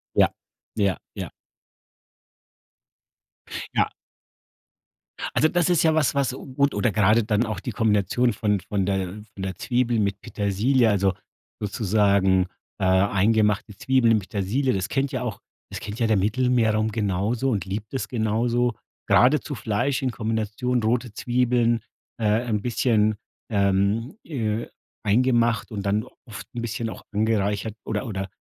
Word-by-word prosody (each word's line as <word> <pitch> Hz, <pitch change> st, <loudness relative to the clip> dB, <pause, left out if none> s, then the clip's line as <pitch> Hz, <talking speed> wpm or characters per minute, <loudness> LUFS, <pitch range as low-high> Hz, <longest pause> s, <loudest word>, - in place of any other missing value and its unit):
Ja, -, -, +5 dB, 0.5 s
ja, 100 Hz, -4 st, +1 dB, 0.2 s
ja. -, -, -5 dB, 2.4 s
Ja. -, -, +1 dB, 1.4 s
Also 155 Hz, -, +5 dB
das 175 Hz, +1 st, +1 dB
ist 175 Hz, -3 st, +3 dB
ja 160 Hz, -1 st, +4 dB
was, 155 Hz, -3 st, +2 dB
was 140 Hz, -2 st, +1 dB
gut 140 Hz, +2 st, -1 dB
oder 120 Hz, -, +1 dB
grade 105 Hz, +2 st, +4 dB
dann 105 Hz, +1 st, +1 dB
auch 110 Hz, -4 st, -3 dB
die -, -, -5 dB
Kombination 110 Hz, +3 st, +2 dB
von 105 Hz, -1 st, 0 dB
von 95 Hz, 0 st, -2 dB
der 95 Hz, -2 st, 0 dB, 0.3 s
von 95 Hz, -, -7 dB
der 95 Hz, -2 st, -3 dB
Zwiebel 120 Hz, +2 st, 0 dB
mit 100 Hz, -2 st, 0 dB
Petersilie, 110 Hz, +5 st, +1 dB
also 100 Hz, -2 st, +2 dB, 0.5 s
sozusagen, 100 Hz, -3 st, +2 dB, 0.3 s
äh, -, -, +1 dB
eingemachte 100 Hz, +2 st, +2 dB
Zwiebeln 130 Hz, -2 st, +3 dB
mit 105 Hz, -3 st, -1 dB
Petersilie, 115 Hz, +7 st, 0 dB
das 95 Hz, 0 st, -1 dB
kennt 135 Hz, +3 st, 0 dB
ja 130 Hz, -4 st, -3 dB
auch 115 Hz, -6 st, -4 dB, 0.3 s
das -, -, -5 dB
kennt 105 Hz, +2 st, -6 dB
ja 115 Hz, -, +2 dB
der 110 Hz, -1 st, +3 dB
Mittelmeerraum 110 Hz, +1 st, +2 dB
genauso 110 Hz, +5 st, 0 dB
und 100 Hz, -7 st, -1 dB
liebt 105 Hz, +5 st, -5 dB
es 130 Hz, -, -2 dB
genauso. 120 Hz, +1 st, +1 dB, 0.3 s
Gerade 135 Hz, +5 st, +5 dB
zu 145 Hz, -, -6 dB
Fleisch 120 Hz, +5 st, -1 dB
in 130 Hz, -2 st, 0 dB
Kombination, 110 Hz, +2 st, -1 dB
rote 120 Hz, +1 st, 0 dB
Zwiebeln, 120 Hz, 0 st, +1 dB, 0.4 s
äh, 110 Hz, -, +1 dB, 0.2 s
ein 105 Hz, -4 st, -1 dB
bisschen, 110 Hz, -2 st, +2 dB, 0.3 s
ähm, 100 Hz, -, +1 dB
äh, 115 Hz, -7 st, -2 dB, 0.4 s
eingemacht 115 Hz, +1 st, +2 dB
und 100 Hz, -2 st, -3 dB
dann 105 Hz, +2 st, +1 dB, 0.2 s
oft 115 Hz, -1 st, -9 dB
'n 120 Hz, -, -3 dB
bisschen 115 Hz, 0 st, -3 dB
auch -, -, -8 dB
angereichert 105 Hz, -1 st, 0 dB
oder 105 Hz, +2 st, -3 dB
oder 95 Hz, -3 st, -4 dB
110 Hz, 145 wpm, -24 LUFS, 100-125 Hz, 2.4 s, Ja